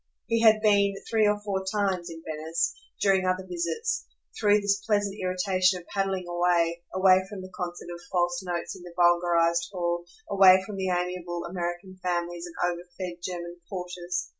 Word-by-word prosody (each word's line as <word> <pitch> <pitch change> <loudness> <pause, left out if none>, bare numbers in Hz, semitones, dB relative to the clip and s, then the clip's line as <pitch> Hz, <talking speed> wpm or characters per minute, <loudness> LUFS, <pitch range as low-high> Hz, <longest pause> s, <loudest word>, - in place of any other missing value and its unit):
He 230 0 +1
had 220 -1 +6
been 200 -2 +4
three 220 -2 +3
or 210 0 +2
four 195 -2 -2
times, 190 -3 -1
in 165 -1 -9
Venice, 160 +2 -1 0.3
during 195 -1 +3
other 185 0 0
visits, 180 - -2 0.3
through 210 -1 +4
this 200 -1 +1
pleasant 205 -2 +1
irritation 185 0 +2
of 175 - -15
paddling 195 -2 -1
away 175 -1 +1
away 185 0 +5
from 205 -3 -7
the 185 - -10
concert 175 -1 -5
of 170 - -9
false 175 -1 +1
notes 175 -2 -4
in - - -12
the 175 -1 -11
vulgarised 170 -1 +3
hall, 175 -2 -1 0.2
away 190 -1 +7
from 200 0 -7
the 190 -1 -1
amiable 180 -1 -2
American 175 +1 -5
families 175 -1 -2
and 170 - -12 0.2
overfed 175 0 -7
German 175 -1 -5
porters. 180 -1 -4
180 Hz, 165 wpm, -27 LUFS, 175-195 Hz, 0.3 s, away